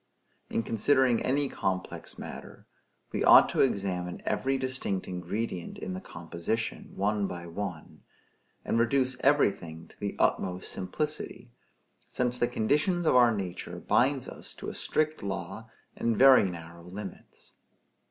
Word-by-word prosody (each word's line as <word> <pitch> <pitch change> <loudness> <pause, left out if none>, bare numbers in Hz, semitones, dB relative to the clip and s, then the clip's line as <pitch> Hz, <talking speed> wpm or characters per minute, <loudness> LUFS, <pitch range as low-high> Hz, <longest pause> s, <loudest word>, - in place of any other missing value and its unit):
In 115 - 0
considering 125 +2 +3
any 140 +2 +1
complex 95 -7 -3
matter, - - -9 0.5
we - - -1
ought - - +8
to - - +1
examine 95 -7 0
every 135 0 0
distinct 130 -7 -2
ingredient 90 +1 -4
in 95 - -5
the 95 - -5
composition, 85 +7 -4
one 100 0 +1
by 85 -2 -6
one; 85 -2 -6 0.6
and 115 - +1
reduce 130 +2 +2
everything 95 - +1
to - - -21
the 100 -1 -3
utmost 90 -1 0
simplicity; 120 +4 -4 0.6
since 125 0 -1
the 120 - +3
condition 150 - +1
of 155 - +4
our 120 -1 +7
nature 95 -4 -4
binds 135 0 +2
us - - -10
to - - -6
a - - -7
strict 155 0 -1
law 95 +2 -5 0.3
and 115 -2 0
very 135 -4 +8
narrow 85 -1 -9
limits. 95 +2 -10
105 Hz, 135 wpm, -29 LUFS, 90-130 Hz, 0.6 s, ought